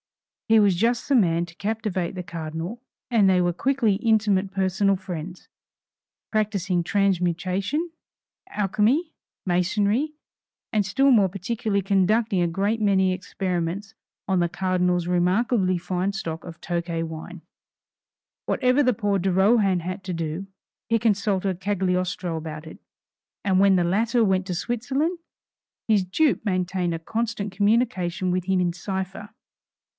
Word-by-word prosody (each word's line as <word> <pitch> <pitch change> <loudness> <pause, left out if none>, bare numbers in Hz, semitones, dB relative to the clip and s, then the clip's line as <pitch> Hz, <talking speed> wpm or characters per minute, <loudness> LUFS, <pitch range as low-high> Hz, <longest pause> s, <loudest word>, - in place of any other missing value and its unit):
He 225 0 +6
was 200 -3 +4
just 235 +6 +1
the 280 - +3
man 170 -7 +3
to 170 -1 -15
captivate 205 -4 -2
the 185 -1 -5
Cardinal, 170 +6 -6 0.3
and 210 -5 +4
they 185 -1 +4
were 175 -1 +1
quickly 245 0 +1
intimate 210 -4 +2
personal 195 +1 +1
friends, 180 -1 -7 0.8
practising 200 -5 0
transmutation, 195 - 0 0.6
alchemy, 225 - +1 0.3
masonry, 205 - +1 0.6
and 210 -2 +2
still 270 +9 +3
more 205 -6 +5
particularly 200 +2 -2
conducting 195 +1 +2
a 175 - +2
great 200 +6 -1
many 190 -2 +3
experiments 185 +1 -3 0.3
on 190 -1 +2
the 175 -1 +1
Cardinal's 180 -1 0
remarkably 185 +2 +2
fine 180 +2 -2
stock 165 -4 -5
of 165 -2 -10
Tokay 170 -1 -2
wine. 165 +2 -8 1.0
Whatever 255 +3 +2
poor 205 -4 0
de 190 +1 0
Rohan 195 -1 +3
had 185 +3 -5
to 185 - -3
do, 165 +3 -4 0.4
he 230 0 +3
consulted 195 -4 0
Cagliostro 185 -3 -1
about 155 -1 -6
it, 160 - -11 0.7
and 190 -2 +3
when 195 -1 +5
the 175 -2 +2
latter 225 +6 +2
went 190 -1 +1
to 180 - -2
Switzerland, 265 - -1 0.7
his 210 -4 +3
dupe 260 - +1
maintained 185 -3 -1
a - - -5
constant 220 +2 -3
communication 195 -4 +1
with 180 0 -1
him 190 0 +1
in 175 -1 +1
cipher. 190 +3 -5
190 Hz, 135 wpm, -24 LUFS, 180-215 Hz, 1.0 s, He